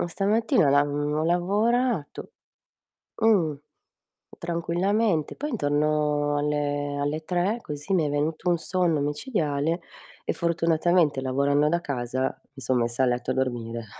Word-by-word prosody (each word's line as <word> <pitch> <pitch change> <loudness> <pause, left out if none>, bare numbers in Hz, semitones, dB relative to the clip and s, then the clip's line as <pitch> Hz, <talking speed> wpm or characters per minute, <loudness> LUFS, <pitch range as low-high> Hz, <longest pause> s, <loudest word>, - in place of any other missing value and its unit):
Oh - - 0
stamattina 205 -2 +2
lav 145 +1 +4
ho 145 +1 -1
lavorato 205 - 0 0.9
mh, 200 -9 +3 0.8
tranquillamente. 175 +2 0
Poi 295 +1 -4
intorno 150 - +1
alle 145 -1 -1
alle 150 +2 -2
3 180 +6 0
così, 150 +6 -4
mi 170 -4 +3
è 145 - -2
venuto 155 +4 -1
un 170 - +2
sonno 175 -2 0
micidiale 150 - -1 0.4
e - - 0
fortunatamente 170 -2 +2
lavorando 140 +3 +2
da 170 +1 +1
casa 130 -3 -3 0.2
mi 135 - -10
son 130 -1 +1
messa 120 +2 +1
a - - +2
letto 125 +1 -1
a - - 0
dormire 120 -3 -2
150 Hz, 135 wpm, -25 LUFS, 145-175 Hz, 0.9 s, lav